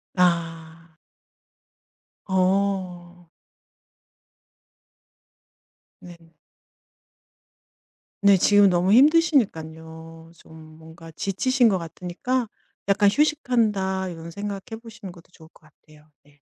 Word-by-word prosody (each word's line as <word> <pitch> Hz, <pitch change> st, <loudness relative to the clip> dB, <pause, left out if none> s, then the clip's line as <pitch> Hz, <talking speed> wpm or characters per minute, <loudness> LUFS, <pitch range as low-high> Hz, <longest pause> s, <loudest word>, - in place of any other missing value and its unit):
아. 165 Hz, -2 st, -2 dB, 1.3 s
어. 185 Hz, -2 st, -2 dB, 2.7 s
네. 170 Hz, -2 st, -15 dB, 1.9 s
네 200 Hz, -1 st, +6 dB
지금 205 Hz, +1 st, +4 dB
너무 180 Hz, +2 st, +1 dB
힘드시니깐요. 165 Hz, -, 0 dB
좀 155 Hz, -1 st, -16 dB
뭔가 160 Hz, +1 st, -14 dB
지치신 230 Hz, -, +1 dB
것 190 Hz, -3 st, 0 dB
같으니까 180 Hz, +9 st, -4 dB, 0.4 s
'약간 200 Hz, 0 st, +3 dB
휴식한다.' 215 Hz, -10 st, 0 dB
이런 165 Hz, -1 st, -9 dB
생각 200 Hz, +2 st, -7 dB
해 -, -, -4 dB
보시는 220 Hz, -5 st, -11 dB
것도 175 Hz, 0 st, -18 dB
좋을 160 Hz, -3 st, -18 dB
것 -, -, -24 dB
같아요. 155 Hz, -1 st, -23 dB, 0.2 s
네. 145 Hz, 0 st, -27 dB
180 Hz, 175 characters per minute, -23 LUFS, 165-205 Hz, 2.7 s, 네